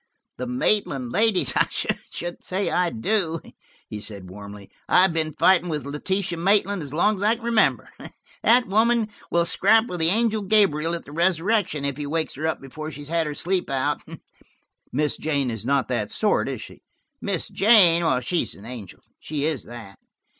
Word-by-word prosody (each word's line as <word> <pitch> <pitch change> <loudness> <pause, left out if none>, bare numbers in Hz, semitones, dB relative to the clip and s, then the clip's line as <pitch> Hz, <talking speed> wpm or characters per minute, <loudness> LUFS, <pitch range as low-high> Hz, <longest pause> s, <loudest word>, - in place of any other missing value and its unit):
"The 125 - -4
Maitland 130 - 0
ladies! 220 - +3
I - - +3
should 175 0 -4
say 190 +2 -2
I 180 -1 +1
do," 165 - -1 0.5
he 105 - -7
said 100 -4 -7
warmly. 100 0 -11 0.2
"I've 180 -1 +5
been 155 -2 -2
fighting 180 -2 +4
with 150 -3 -3
Letitia 175 +5 -2
Maitland 200 +1 +2
as 145 -3 -5
long 195 +7 +2
as - - -7
I 215 +3 +3
can 235 - -15
remember. 230 -2 +2 0.5
That 245 +1 +4
woman 220 +2 +2 0.2
will 170 0 +2
scrap 220 +6 +4
with 180 -7 -5
the 160 0 +4
angel 220 +2 +1
Gabriel 185 -6 +2
at 170 - -8
the - - -12
resurrection, 170 -1 +1
if 140 -1 -2
he 145 -1 -4
wakes 160 +2 -2
her 155 +3 -3
up 160 - -2
before 155 +3 -8
she's 145 -1 -9
had 165 -1 0
her 150 - -5
sleep 180 +4 0
out." 135 +2 -1 0.9
"Miss 150 +3 0
Jane 140 -5 -1
is 115 +1 -5
not 140 -3 +1
that 115 -5 -2
sort, 215 - +1
is - - -5
she?" - - -13 0.4
"Miss 195 -5 -1
Jane? 190 -6 +5 0.2
She's 165 +8 -1
an 100 - -14
angel–she 125 - -7
is 155 -5 -2
that. 115 -5 -11
165 Hz, 175 wpm, -23 LUFS, 140-195 Hz, 0.9 s, I've